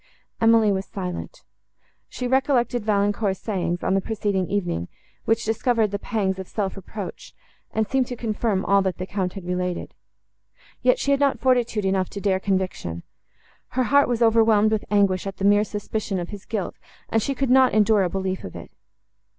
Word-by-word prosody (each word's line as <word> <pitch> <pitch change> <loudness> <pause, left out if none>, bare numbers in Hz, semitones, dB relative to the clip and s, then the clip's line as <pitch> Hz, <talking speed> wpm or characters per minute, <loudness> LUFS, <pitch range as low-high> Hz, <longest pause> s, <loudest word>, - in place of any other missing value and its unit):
Emily 225 -2 +5
was 195 0 -2
silent. 190 - -6 0.7
She 250 - -5
recollected 250 -2 +1
Valancourt's 205 -1 +1
sayings, 175 -5 -2
on 190 - +1
the 195 - +2
preceding 200 -3 -1
evening, 175 - -1 0.4
which 225 +1 +1
discovered 225 -1 +1
the 200 - -2
pangs 195 -3 -1
of 190 - -6
self 200 -3 -3
reproach, 195 0 -8 0.4
and 220 -1 0
seemed 260 +2 +1
to 250 - -5
confirm 215 -4 -1
all 200 0 +4
that 190 -2 -1
the 185 - -4
Count 190 -2 -2
had 195 -3 -8
related. 180 0 -3 0.9
Yet - - +4
she 280 - 0
had 280 - +3
not 280 -4 +2
fortitude 240 -4 +1
enough 190 -1 +1
to 200 - -6
dare 190 -2 +1
conviction. 185 - -2 0.7
Her 255 - +4
heart 280 +4 +4
was 240 -1 +1
overwhelmed 220 -2 +4
with 215 -1 0
anguish 200 -2 +2
at 195 -1 -6
the 195 - -2
mere 205 +1 +5
suspicion 210 -1 -3
of 175 -1 -4
his 205 -2 -9
guilt, 210 -5 -3 0.3
and 225 - +2
she 275 +5 -2
could 270 -2 0
not 260 0 +6
endure 215 -1 +4
a 180 - +1
belief 190 0 -3
of 90 - -8
it. - - -9
205 Hz, 185 wpm, -23 LUFS, 190-230 Hz, 0.9 s, not